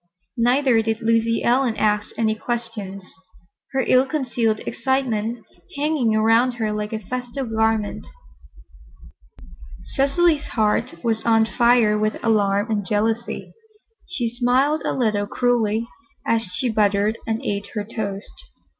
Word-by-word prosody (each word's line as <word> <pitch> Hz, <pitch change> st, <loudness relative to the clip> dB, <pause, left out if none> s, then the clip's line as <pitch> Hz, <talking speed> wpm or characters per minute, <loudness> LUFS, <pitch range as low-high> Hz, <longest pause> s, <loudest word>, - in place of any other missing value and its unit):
Neither 245 Hz, 0 st, +3 dB
did 225 Hz, 0 st, -2 dB
Lucy 230 Hz, 0 st, +2 dB
Ellen 245 Hz, -1 st, +2 dB
ask 210 Hz, -1 st, +1 dB
any 220 Hz, -1 st, +2 dB
questions, 220 Hz, -4 st, -5 dB, 0.7 s
her 270 Hz, -, +1 dB
ill 255 Hz, +2 st, +4 dB
concealed 240 Hz, -7 st, 0 dB
excitement 235 Hz, -3 st, -1 dB, 0.3 s
hanging 285 Hz, -7 st, +1 dB
around 225 Hz, +3 st, +3 dB
her 220 Hz, -3 st, -2 dB
like 210 Hz, 0 st, -3 dB
a 220 Hz, -, -2 dB
festal 250 Hz, +5 st, -5 dB
garment. 220 Hz, -2 st, -1 dB, 1.9 s
Cecily's 295 Hz, +3 st, +2 dB
heart 210 Hz, -5 st, 0 dB
was 225 Hz, -2 st, 0 dB
on 225 Hz, -1 st, +4 dB
fire 235 Hz, -2 st, +3 dB
with 215 Hz, 0 st, 0 dB
alarm 205 Hz, -1 st, +2 dB
and 205 Hz, -2 st, 0 dB
jealousy. 220 Hz, +4 st, -2 dB, 0.5 s
She 260 Hz, -10 st, -2 dB
smiled 255 Hz, +6 st, +1 dB
a -, -, 0 dB
little 215 Hz, -5 st, 0 dB
cruelly 230 Hz, -2 st, +1 dB, 0.4 s
as 225 Hz, -2 st, +1 dB
she 180 Hz, +8 st, -1 dB
buttered 210 Hz, -1 st, +1 dB
and 225 Hz, 0 st, 0 dB
ate 200 Hz, 0 st, -2 dB
her 210 Hz, -, -1 dB
toast. 205 Hz, -2 st, -5 dB
225 Hz, 125 wpm, -22 LUFS, 215-245 Hz, 1.9 s, ill